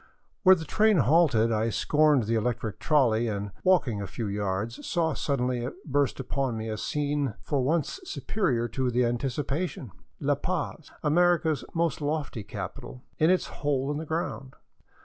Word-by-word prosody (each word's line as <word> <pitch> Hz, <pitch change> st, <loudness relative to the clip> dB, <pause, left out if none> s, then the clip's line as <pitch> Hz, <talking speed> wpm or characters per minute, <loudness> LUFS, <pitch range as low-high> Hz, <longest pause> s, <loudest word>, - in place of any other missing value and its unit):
Where 190 Hz, -1 st, +8 dB
the 160 Hz, -3 st, -6 dB
train 215 Hz, +5 st, +3 dB
halted 135 Hz, -5 st, +4 dB
I 110 Hz, +1 st, +1 dB
scorned 150 Hz, +2 st, +3 dB
the 110 Hz, +2 st, -1 dB
electric 110 Hz, -2 st, -1 dB
trolley 120 Hz, -7 st, +3 dB
and, 100 Hz, -2 st, -3 dB
walking 150 Hz, -, +2 dB
a 100 Hz, -, -4 dB
few 110 Hz, +5 st, -5 dB
yards, 100 Hz, +2 st, -3 dB
saw 165 Hz, -3 st, 0 dB
suddenly 125 Hz, -3 st, -1 dB, 0.2 s
burst 140 Hz, -3 st, 0 dB
upon 135 Hz, -2 st, -2 dB
me 110 Hz, 0 st, -4 dB
a 110 Hz, -, -3 dB
scene 145 Hz, -4 st, -1 dB
for 140 Hz, -2 st, 0 dB
once 155 Hz, -, 0 dB
superior 185 Hz, -, -1 dB
to 130 Hz, -1 st, -1 dB
the 125 Hz, +1 st, +2 dB
anticipation, 135 Hz, -, -2 dB, 0.2 s
— -, -, -42 dB
La -, -, +2 dB
Paz, -, -, -3 dB
America's 165 Hz, -1 st, +3 dB
most 165 Hz, -3 st, 0 dB
lofty 145 Hz, -5 st, -2 dB
capital, 125 Hz, +5 st, -7 dB, 0.2 s
in 155 Hz, -, +4 dB
its 185 Hz, 0 st, +3 dB, 0.2 s
hole 140 Hz, -1 st, 0 dB
in 145 Hz, -, -2 dB
the 160 Hz, -, -4 dB
ground. 145 Hz, -4 st, -3 dB
135 Hz, 160 wpm, -27 LUFS, 115-155 Hz, 0.2 s, Where